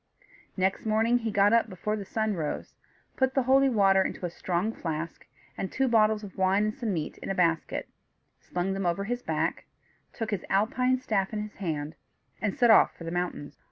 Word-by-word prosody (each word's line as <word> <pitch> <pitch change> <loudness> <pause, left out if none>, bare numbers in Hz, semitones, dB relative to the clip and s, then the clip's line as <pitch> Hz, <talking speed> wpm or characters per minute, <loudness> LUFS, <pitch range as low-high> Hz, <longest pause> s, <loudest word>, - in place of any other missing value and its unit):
Next 190 +1 0
morning 225 +2 +2
he 230 -1 -2
got 205 +1 +4
up 230 -1 +3
before 210 +3 -3
the 205 -2 -6
sun 220 +1 -1
rose, 160 -5 -4 0.4
put 260 0 +1
the 270 - +3
holy 270 +2 +4
water 195 -5 +4
into 190 - -3
a 175 - -3
strong 180 +4 -1
flask, 165 -2 -5 0.3
and 190 - -4
two 265 0 +1
bottles 220 -2 +3
of 195 -1 -10
wine 190 +2 +3
and 215 0 0
some 235 -4 -3
meat 160 -5 -3
in - - -7
a 195 - -1
basket, 165 -3 0 0.5
slung 180 +2 -2
them 195 -2 -1
over 175 +3 0
his 245 +4 -3
back, - - -2 0.5
took 225 -1 -4
his 200 -4 -2
alpine 250 +6 +2
staff 210 -5 -1
in 210 -1 -2
his 210 - -10
hand, 155 -5 -3 0.5
and 205 -2 -1
set 240 -2 +5
off 220 - +5
for - - -9
the 165 - -5
mountains. 175 -5 -4
200 Hz, 200 wpm, -28 LUFS, 180-225 Hz, 0.5 s, set